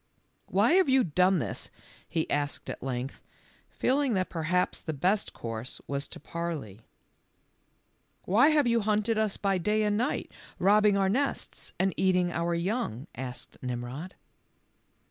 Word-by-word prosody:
"Why -, -, +3 dB
have 370 Hz, -5 st, +5 dB
you 260 Hz, -1 st, +5 dB
done 180 Hz, +3 st, +3 dB
this?" 135 Hz, -, -3 dB, 0.4 s
he* 160 Hz, -, -1 dB
asked 145 Hz, 0 st, -1 dB
at -, -, -8 dB
length, 130 Hz, 0 st, -4 dB, 0.5 s
feeling 270 Hz, -3 st, +1 dB
that 185 Hz, -1 st, -1 dB
perhaps 175 Hz, +2 st, 0 dB
the 160 Hz, -, -4 dB
best 190 Hz, +8 st, +1 dB
course 115 Hz, +1 st, -5 dB
was 140 Hz, 0 st, -3 dB
to -, -, -10 dB
parley. 150 Hz, -, -5 dB, 0.7 s
" -, -, -44 dB
Why 225 Hz, +10 st, +5 dB
have 305 Hz, -3 st, +4 dB
you 235 Hz, -1 st, +3 dB
hunted 215 Hz, +1 st, +1 dB
us 215 Hz, -2 st, 0 dB
by 195 Hz, -2 st, +1 dB
day 210 Hz, +4 st, +1 dB
and 210 Hz, 0 st, +1 dB
night, 245 Hz, -, -1 dB, 0.3 s
robbing 205 Hz, +1 st, +4 dB
our 195 Hz, -1 st, +3 dB
nests 270 Hz, +8 st, -2 dB
and 190 Hz, 0 st, +2 dB
eating 180 Hz, -2 st, +2 dB
our 170 Hz, 0 st, 0 dB
young?" 170 Hz, -, -2 dB
asked 125 Hz, -2 st, -6 dB
Nimrod. 125 Hz, +8 st, -5 dB
185 Hz, 145 wpm, -29 LUFS, 145-215 Hz, 0.7 s, have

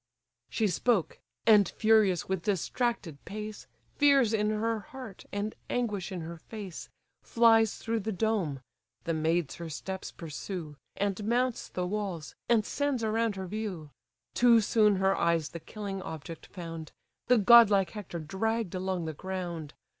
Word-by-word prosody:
She 220 Hz, -, +1 dB
spoke: 195 Hz, -1 st, +1 dB, 0.3 s
and 210 Hz, -3 st, +6 dB
furious, 215 Hz, -5 st, +3 dB
with 190 Hz, -2 st, -1 dB
distracted 200 Hz, -, -1 dB
pace, 210 Hz, -6 st, -7 dB, 0.3 s
Fears 275 Hz, -6 st, +5 dB
in 210 Hz, -1 st, +2 dB
her 220 Hz, +1 st, 0 dB
heart, 255 Hz, -5 st, -10 dB
and 205 Hz, +2 st, -2 dB, 0.2 s
anguish 210 Hz, -6 st, -1 dB
in 180 Hz, -2 st, -4 dB
her 165 Hz, +1 st, -7 dB
face, 200 Hz, -2 st, -8 dB, 0.3 s
Flies 225 Hz, -2 st, +4 dB
through 225 Hz, 0 st, -2 dB
the 220 Hz, +1 st, -3 dB
dome 190 Hz, -9 st, -1 dB, 0.4 s
(the 165 Hz, -, -1 dB
maids 160 Hz, 0 st, 0 dB
her 170 Hz, -1 st, -6 dB
steps 190 Hz, +5 st, -5 dB
pursue), 165 Hz, 0 st, -6 dB, 0.2 s
And 200 Hz, +1 st, -1 dB
mounts 245 Hz, +2 st, 0 dB
the 180 Hz, -, -2 dB
walls, 190 Hz, -5 st, -3 dB, 0.2 s
and 225 Hz, -3 st, +4 dB
sends 285 Hz, -5 st, -1 dB
around 220 Hz, -1 st, +1 dB
her 190 Hz, -1 st, -5 dB
view. 185 Hz, -6 st, -5 dB, 0.4 s
Too 240 Hz, -1 st, +6 dB
soon 210 Hz, -1 st, +4 dB
her 190 Hz, +1 st, +2 dB
eyes 165 Hz, -3 st, +1 dB
the 170 Hz, -, -7 dB
killing 200 Hz, +2 st, -6 dB
object 160 Hz, -1 st, -8 dB
found, 165 Hz, -3 st, -7 dB, 0.4 s
The 250 Hz, -, +5 dB
godlike 210 Hz, -3 st, +7 dB
Hector 205 Hz, -5 st, -6 dB
dragg'd 195 Hz, +5 st, -2 dB
along 185 Hz, -2 st, -2 dB
the 160 Hz, -, -3 dB
ground. 175 Hz, -3 st, -5 dB
200 Hz, 145 wpm, -30 LUFS, 170-225 Hz, 0.4 s, godlike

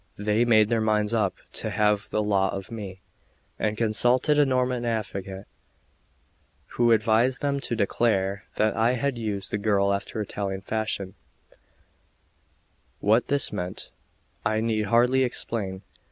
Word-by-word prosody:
They 105 Hz, +3 st, +1 dB
made 110 Hz, -3 st, +4 dB
their 115 Hz, -2 st, +1 dB
minds 105 Hz, 0 st, +1 dB
up 110 Hz, -2 st, +1 dB, 0.2 s
to -, -, -1 dB
have 105 Hz, -1 st, +1 dB
the 105 Hz, -, 0 dB
law 100 Hz, -2 st, +2 dB
of 95 Hz, +3 st, -6 dB
me, 100 Hz, -4 st, -7 dB, 0.6 s
and 105 Hz, 0 st, -1 dB
consulted 120 Hz, +6 st, +2 dB
a 145 Hz, -, +5 dB
Norman 125 Hz, -1 st, 0 dB
advocate, 100 Hz, -4 st, -4 dB, 1.2 s
who 120 Hz, -1 st, +2 dB
advised 115 Hz, +4 st, +2 dB
them 140 Hz, -1 st, 0 dB
to 120 Hz, -, -3 dB
declare 100 Hz, -2 st, 0 dB
that 110 Hz, 0 st, +1 dB
I 115 Hz, +3 st, +2 dB
had 130 Hz, 0 st, -1 dB
used 105 Hz, -3 st, -3 dB
the 105 Hz, -, -1 dB
girl 100 Hz, -1 st, +2 dB
after 100 Hz, +2 st, -4 dB
the 110 Hz, -, 0 dB
Italian 95 Hz, -1 st, -4 dB
fashion; 100 Hz, -2 st, -3 dB, 1.9 s
what 110 Hz, +4 st, +3 dB
this 140 Hz, 0 st, +1 dB
meant 90 Hz, +1 st, -5 dB, 0.5 s
I 110 Hz, 0 st, +1 dB
need 110 Hz, -2 st, 0 dB
hardly 125 Hz, +4 st, +3 dB
explain. 100 Hz, -6 st, -2 dB
110 Hz, 140 wpm, -25 LUFS, 100-120 Hz, 1.9 s, a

